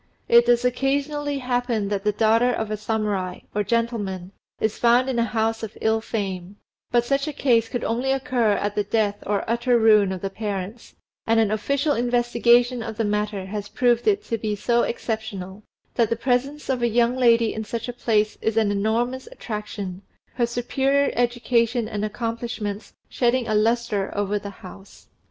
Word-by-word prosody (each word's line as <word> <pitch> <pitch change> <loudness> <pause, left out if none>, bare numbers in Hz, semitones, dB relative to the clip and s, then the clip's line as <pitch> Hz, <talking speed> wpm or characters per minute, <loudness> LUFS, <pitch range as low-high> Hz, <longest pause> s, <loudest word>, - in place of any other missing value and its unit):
It 235 0 +6
does 240 0 +3
occasionally 285 +3 0
happen 245 -5 -1
that 200 -1 -2
the 210 - +2
daughter 225 +3 +3
of 220 -3 -3
a - - 0
Samurai, 210 -4 -2
or 210 - 0
gentleman, 205 -5 -2 0.3
is 220 -1 -1
found 240 +2 +4
in 255 -3 0
a - - +3
house 225 0 -1
of 220 -2 -7
ill 220 0 +1
fame, 195 -4 -4 0.3
but 240 -1 +2
such 275 +3 0
a - - -1
case 235 -5 +2
could 245 - -3
only 245 +4 0
occur 260 -5 +1
at 205 0 -1
the 210 0 0
death 205 0 -1
or 205 0 -1
utter 235 +2 +2
ruin 215 -3 +5
of 185 -2 -5
the 195 - -3
parents, 205 +1 -5 0.3
and 225 0 +4
an 215 -2 +2
official 280 +7 0
investigation 240 0 +2
of 225 -1 -6
the 225 - +1
matter 210 -2 -1
has 205 +1 -5
proved 240 +2 +1
it 415 -1 +3
to 230 - -3
be 210 -1 -2
so 235 +3 +1
exceptional, 215 -5 -4 0.3
that 230 -3 +2
the 230 - +1
presence 265 +5 -1
of 260 -2 -1
a 240 - +3
young 235 +1 +2
lady 235 -3 +3
in 220 - -4
such 230 +2 -5
a 245 - -4
place 215 -3 0
is 220 0 -1
an 215 -2 +3
enormous 230 +6 -1
attraction, 210 - -6 0.3
her 240 -2 +1
superior 270 +4 +1
education 240 -1 +1
and 210 -1 -4
accomplishments 225 -1 -4
shedding 245 -1 +1
a 215 - 0
lustre 215 -2 +1
over 205 0 0
the 200 0 -7 0.2
house. 195 +2 -13
230 Hz, 180 wpm, -23 LUFS, 210-245 Hz, 0.3 s, It